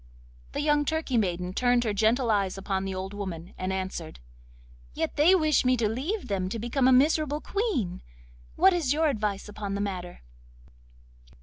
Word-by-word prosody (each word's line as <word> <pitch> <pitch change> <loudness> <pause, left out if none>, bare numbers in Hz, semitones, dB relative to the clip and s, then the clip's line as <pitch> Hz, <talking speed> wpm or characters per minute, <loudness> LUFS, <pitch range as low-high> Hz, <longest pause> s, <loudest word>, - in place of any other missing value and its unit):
The - - -1
young 295 0 +3
Turkey 315 -3 -1
maiden 180 -4 0
turned 245 +2 +2
her 215 -3 -1
gentle 225 +4 +2
eyes 195 -2 0
upon 195 0 -2
the 190 -1 -3
old 190 +1 -5
woman, 180 -4 -6
and 185 +1 -3
answered: 185 - -5 0.8
'Yet 160 - -2
they 325 +6 +5
wish 310 -4 +3
me 255 0 +3
to 225 -2 +1
leave 295 - -3
them 185 -2 -1
to 230 - -4
become 240 +4 +1
a - - +6
miserable 295 +2 +3
Queen! 305 - -2 0.5
what 380 +2 +5
is 310 -7 +1
your 315 +1 +2
advice 210 -6 -2
upon 205 -1 -5
the - - -3
matter? 180 -3 -5
220 Hz, 175 wpm, -27 LUFS, 190-290 Hz, 0.8 s, a